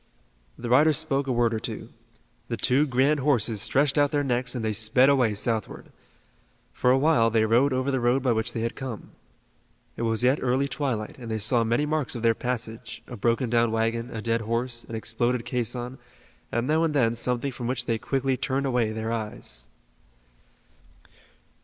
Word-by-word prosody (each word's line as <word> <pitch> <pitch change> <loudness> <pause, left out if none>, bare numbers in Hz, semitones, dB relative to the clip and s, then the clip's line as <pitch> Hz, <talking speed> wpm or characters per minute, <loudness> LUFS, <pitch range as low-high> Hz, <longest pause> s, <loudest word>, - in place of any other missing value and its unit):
The 120 - -6
riders 145 +5 +5
spoke 140 -3 0
a - - 0
word 120 -1 +2
or 110 - -1
two. 110 0 -6 0.6
The 115 - -3
two 130 +8 +2
grand 135 +3 +2
horses 120 -7 +1
stretched 140 +4 +2
out 145 0 +4
their 145 -1 0
necks, 125 -1 -1
and 115 -3 -3
they 110 - 0
sped 115 +5 +4
away 125 -6 +3
southward. 110 0 -3 0.8
For 125 - +1
a 130 - +5
while 135 -5 +3
they 110 -1 +2
rode 120 +6 +3
over 130 +2 0
the 130 - 0
road 125 +2 +2
by 130 - +2
which 110 -1 0
they 115 - -3
had 115 +1 -2
come. 130 -6 -7 0.8
It - - -6
was 115 0 0
yet 130 +4 +3
early 130 +2 +1
twilight 125 -5 -3
and 120 -2 -8
they 110 - -1
saw 115 +3 +1
many 120 +6 +1
marks 150 -4 -1
of 120 - -5
their 115 -1 +4
passage, 115 -1 -5
a 125 - -8
broken 120 +4 0
down 115 0 +2
wagon, 115 +1 -1
a 110 -3 -6
dead 115 0 0
horse, 120 +2 -2
an 115 - -5
exploded 120 +3 -1
caisson, 125 +1 -3 0.5
and 120 +1 0
now 155 +4 +2
and 160 -2 0
then 115 -5 +3
something 125 +3 -1
from 120 -1 -5
which 125 -1 -2
they 115 -2 -1
quickly 135 +1 0
turned 135 +1 -1
away 125 -4 +1
their 110 +1 -3
eyes. 110 -2 -4
120 Hz, 190 wpm, -26 LUFS, 115-135 Hz, 0.8 s, riders